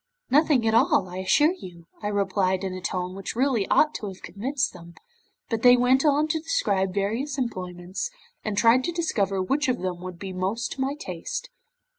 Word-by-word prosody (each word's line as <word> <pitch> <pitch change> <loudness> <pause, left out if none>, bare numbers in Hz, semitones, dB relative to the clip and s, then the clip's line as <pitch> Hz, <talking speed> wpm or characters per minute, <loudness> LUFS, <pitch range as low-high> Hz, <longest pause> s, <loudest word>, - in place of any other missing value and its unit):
'"Nothing 285 -5 +4
at 220 - +2
all, 260 - +4
I 180 +1 -8
assure 295 - +3
you," 175 - -11 0.2
I 205 - -2
replied 195 -2 0
in 190 -1 -3
a 185 - -6
tone 180 0 -3
which 195 +2 -5
really 250 -5 +1
ought 305 0 +4
to 210 - -5
have 190 -1 -9
convinced 245 +8 -2
them, 170 -1 -13 0.5
but 225 -2 -2
they 245 +1 +7
went 255 +2 +3
on 295 +1 +3
to 320 - +1
describe 255 - 0
various 225 +9 -2
employments, 185 - -4 0.3
and 210 -2 -3
tried 230 +4 +5
to 345 - -1
discover 200 - 0
which 280 +9 0
of 250 -1 +1
them 180 -1 -3
would 185 -1 -7
be 190 +1 -6
most 200 +5 -2
to 265 - -5
my 270 +2 0
taste. 310 - -6
215 Hz, 195 wpm, -25 LUFS, 185-275 Hz, 0.5 s, they